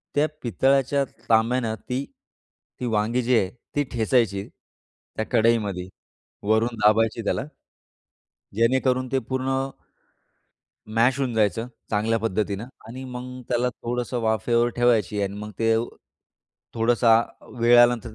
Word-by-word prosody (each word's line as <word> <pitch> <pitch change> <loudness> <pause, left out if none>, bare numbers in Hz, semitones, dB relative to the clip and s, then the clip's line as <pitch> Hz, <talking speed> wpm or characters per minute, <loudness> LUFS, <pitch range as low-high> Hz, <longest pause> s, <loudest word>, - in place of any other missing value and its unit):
त्या 145 +1 +3
पितळाच्या 135 +3 +2 0.3
तांब्यानं 115 0 +2
ती, 125 +5 -4 0.7
ती 125 - -3
वांगी 115 +2 +1
जी 125 +1 +2
आहे, 95 -4 +1 0.3
ती 145 - +2
ठेचायची, 110 -4 +1
त्या 110 - -11
कढईमध्ये. 110 -6 +2 0.6
वरून 110 +2 +2
दाबायची 110 +2 +3
त्याला. - - 0 1.1
जेणेकरून 130 +2 +2
ते 135 - +2
पूर्ण, 130 0 -2 1.5
मॅश 125 +4 +3
होऊन 130 -4 -1
जायचं, 110 +1 +1 0.2
चांगल्या 110 +2 +1
पद्धतीनं 105 -1 -2 0.2
आणि 130 +3 -7
मग 125 0 -7
त्याला 125 0 +1
थोडंसं 120 +1 -3
वाफेवर 115 +2 +2
ठेवायची 115 -4 +2
आणि 100 0 -2
मग 105 0 -6
ते 115 0 +3 1.0
थोडासा 115 0 +4 0.5
वेळ 120 +1 +6
आल्यानंतर 120 -2 +3
115 Hz, 115 wpm, -24 LUFS, 110-125 Hz, 1.5 s, वेळ